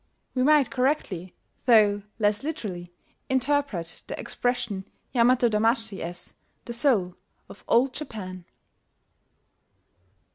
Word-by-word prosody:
We 255 - 0
might 290 -1 +4
correctly, 225 - -1 0.3
though 210 -4 +5 0.2
less 210 -1 +2
literally, 195 - -5 0.4
interpret 265 - 0
the - - -5
expression 235 -6 -2 0.2
Yamato 245 0 +4
damashi 225 -2 +1
as 175 +1 -4 0.3
"The 235 - -5
Soul 230 -8 +2 0.3
of - - -13
Old 250 +2 +3
Japan." 185 - -6
230 Hz, 100 wpm, -26 LUFS, 190-255 Hz, 0.4 s, though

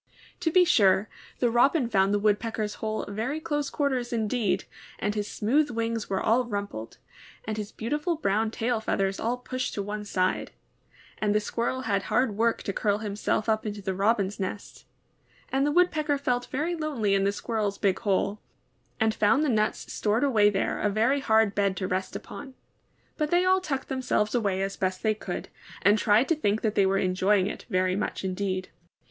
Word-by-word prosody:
To 350 -2 +1
be 360 +2 +5
sure, 200 - +4 0.3
the 240 -2 +1
Robin 255 +3 +3
found 195 -3 +2
the 205 - +3
Woodpecker's 210 +1 0
hole 215 0 -2
very 225 +9 -3
close 295 -2 -2
quarters 260 -4 -1
indeed, 215 -4 0 0.3
and 205 +1 -1
his 210 -1 -2
smooth 285 +8 +1
wings 230 -1 -2
were 195 - 0
all 245 +3 +2
rumpled, 200 - -5 0.5
and 215 - -2
his 210 -1 -5
beautiful 295 +9 -2
brown 220 -7 0
tail 230 +1 -1
feathers 195 -3 -1
all 240 +2 -1
pushed 255 +1 -4
to 200 - -2
one 210 +1 -4
side; 185 -2 -1 0.7
and 210 -1 +1
the - - +5
Squirrel 235 +4 -2
had 200 -5 0
hard 250 -5 +2
work 230 +2 +1
to 200 - -3
curl 205 0 +1
himself 210 0 -2
up 220 -1 +1
into 210 -1 -4
the 190 -1 -3
Robin's 200 0 +1
nest; 195 +2 -6 0.6
and 270 +2 +1
the - - +1
Woodpecker 305 -4 +2
felt 245 -3 -1
very 310 +6 -2
lonely 280 -11 -1
in 195 0 +2
the 200 - +2
Squirrel's 210 -1 -2
big 195 -2 +1
hole, 200 0 0 0.6
and 220 -1 +2
found 220 +8 +3
the 300 - +1
nuts 215 -3 0
stored 215 +4 +1
away 220 -7 +4
there 195 -1 -1
a 210 - +2
very 230 +7 +2
hard 220 -5 +3
bed 200 -2 +1
to 185 - -2
rest 185 +1 -2
upon; 270 -2 -8 0.6
but 305 -2 0
they 350 +2 +3
all 375 0 +4
tucked 275 -6 -3
them 265 -1 -3
selves 210 -4 0
away 200 -5 0
as 195 0 -3
best 185 0 -2
they 220 -1 +3
could, 215 - -6 0.3
and 205 +2 +5
tried 215 +4 +4
to - - +3
think 215 -8 0
that 215 -2 +1
they 195 -2 +3
were 195 0 +2
enjoying 185 +1 +2
it 205 - -6
very 185 0 +1
much 200 - -3
indeed. 185 0 -2
215 Hz, 190 wpm, -27 LUFS, 200-250 Hz, 0.7 s, be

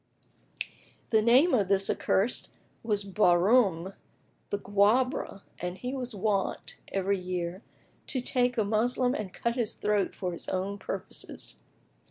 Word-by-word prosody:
"[FN#24] - - -2 0.4
The 220 -1 +5
name 255 +10 +5
of 205 -7 +3
this 195 0 +5
accursed 205 +6 0 0.2
was 210 -3 0
Bahrám 190 -1 +3 0.6
the 205 - -1
Guebre, 205 +2 +1 0.2
and 180 +1 -4
he 250 +4 -4
was 250 -4 -4
wont, 200 -1 -1
every 195 0 0
year, 180 0 -4 0.5
to 260 - -1
take 250 0 +1
a 220 - +3
Moslem 245 +4 +2
and 210 -7 -4
cut 235 +4 -1
his 235 -4 -1
throat 205 -1 0
for 180 -2 -3
his 170 - -8
own 195 +2 -2
purposes. - - -6
205 Hz, 140 wpm, -29 LUFS, 190-240 Hz, 0.6 s, The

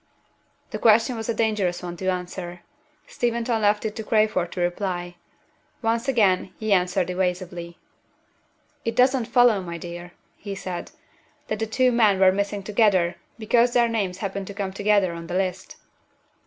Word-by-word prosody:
The - - -4
question 230 +3 +4
was 225 0 -5
a - - +2
dangerous 210 -6 0
one 175 -1 -5
to 190 - -4
answer. 180 -1 -5 0.4
Steventon 235 -1 -1
left 210 +1 +2
it 215 -1 -3
to 220 - -4
Crayford 215 -5 +1
to - - -5
reply. 175 0 -2 0.7
Once 230 +3 0
again 200 -8 +2
he 220 -2 0
answered 180 0 +1
evasively. 180 -2 -3 1.1
"It 230 - -2
doesn't 255 -1 +3
follow, 235 -3 +4
my 170 -2 -6
dear," 175 +1 -8 0.2
he 200 -1 -6
said, 185 -2 -6 0.6
"that - - -2
the 220 - -1
two 255 +3 +2
men 215 -5 +3
were 190 -1 +6
missing 200 +1 -2
together 195 -4 +2 0.2
because 235 +2 +2
their 240 -1 +4
names 200 -6 -2
happen 195 0 -4
to 200 - -9
come 195 -2 -3
together 200 -3 +2
on 170 0 -8
the 175 - -4
list." 190 -1 -3
200 Hz, 160 wpm, -24 LUFS, 180-225 Hz, 1.1 s, were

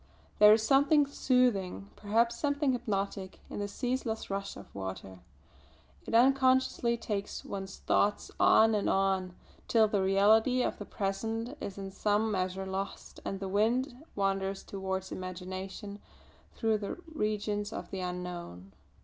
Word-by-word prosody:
There 210 0 +9
is 215 0 +5
something 285 +5 +4
soothing, 245 -9 +1
perhaps 230 +3 +1
something 285 +1 +1
hypnotic, 200 -5 -3
in - - -4
the 205 - -2
ceaseless 240 -1 -3
rush 195 0 -3
of 100 - -13
water. 95 -1 -6 0.9
It - - -1
unconsciously 260 -1 +4
takes 205 -3 -4
one's 195 -1 -6
thoughts 205 0 +1
on 225 0 +6
and 210 -1 +1
on, 190 -2 +1 0.3
till 220 -2 +4
the 205 -2 0
reality 215 +6 +4
of - - -2
the 205 - -6
present 225 +7 -3
is 195 - -5
in 195 -1 -6
some 210 +2 +1
measure 190 0 -2
lost 190 +1 -5
and 195 - -4
the 195 - -4
mind 230 +7 +1 0.2
wanders 195 -1 -1
towards 190 -1 -4
imagination 185 +3 -6 0.6
through 220 -2 +1
the 200 - -5 0.2
regions 210 -4 -1
of - - -7
the 195 - -4
unknown. 180 - -6
205 Hz, 140 wpm, -31 LUFS, 190-230 Hz, 0.9 s, There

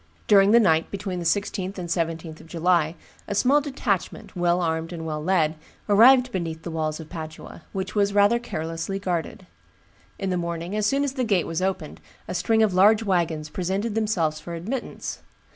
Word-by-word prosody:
During 200 -1 +6
the 235 +3 +7
night 165 -7 +3
between 195 -2 -4
the 170 - -5
16th 195 +1 -1
and 180 -2 -5
17th 165 -1 -2
of - - -15
July, 170 -1 +1 0.3
a 205 - -3
small 270 +7 +4
detachment, 255 - -3
well 175 0 +2
armed 165 -1 -1
and 165 -2 -6
well 155 -1 -3
led, 165 -3 +2 0.3
arrived 250 +5 +6
beneath 165 -5 -4
the 170 - -5
walls 155 -1 -2
of 160 - -8
Padua, 160 -1 -8
which 190 0 -4
was 200 -1 +2
rather 205 +3 +4
carelessly 165 -3 -4
guarded. 185 0 -3 0.7
In 195 -2 -2
the 180 - 0
morning, 170 +2 -3
as 210 -1 +1
soon 275 +5 +1
as 280 -2 -1
the 260 -2 -1
gate 200 -7 +1
was 165 +2 -3
opened, 185 -5 -3 0.3
a - - -4
string 220 +5 +2
of 210 -4 +2
large 210 +4 +5
wagons 170 -6 0
presented 195 +6 -2
themselves 185 -9 0
for 170 +2 -7
admittance. 230 +10 -5
180 Hz, 185 wpm, -24 LUFS, 165-205 Hz, 0.7 s, the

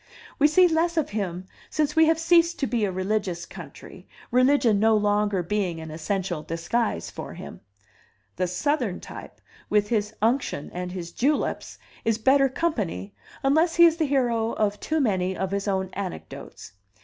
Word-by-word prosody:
We 295 - +6
see 360 +4 +5
less 335 +1 +1
of 310 - 0
him 185 -4 -3 0.2
since 300 -1 0
we 320 0 +6
have 325 0 +3
ceased 335 +1 +3
to 275 - 0
be 230 -3 0
a 195 - -2
religious 185 -2 -2
country, - - -12 0.2
religion 250 -4 +4
no 220 +1 +4
longer 205 -2 +1
being 185 -3 -1
an 160 -1 -8
essential 175 +1 -2
disguise 165 - -2
for - - -8
him. - - -10 0.8
The 185 - 0
Southern 240 - -1
type, - - -10 0.3
with 210 -1 +2
his 215 -2 -1
unction 230 - 0
and 180 0 -4
his 175 -2 -6
juleps, 285 - -1 0.3
is 225 -1 +1
better 270 +4 +4
company, 205 - -2 0.3
unless 315 +5 +3
he 340 - +8
is 330 -1 +4
the 320 - +1
hero 240 -5 +1
of 210 -1 0
too 315 0 -1
many 190 -7 0
of 190 0 -2
his 200 +1 -2
own 190 -1 -1
anecdotes. 190 - -7
215 Hz, 165 wpm, -25 LUFS, 185-285 Hz, 0.8 s, he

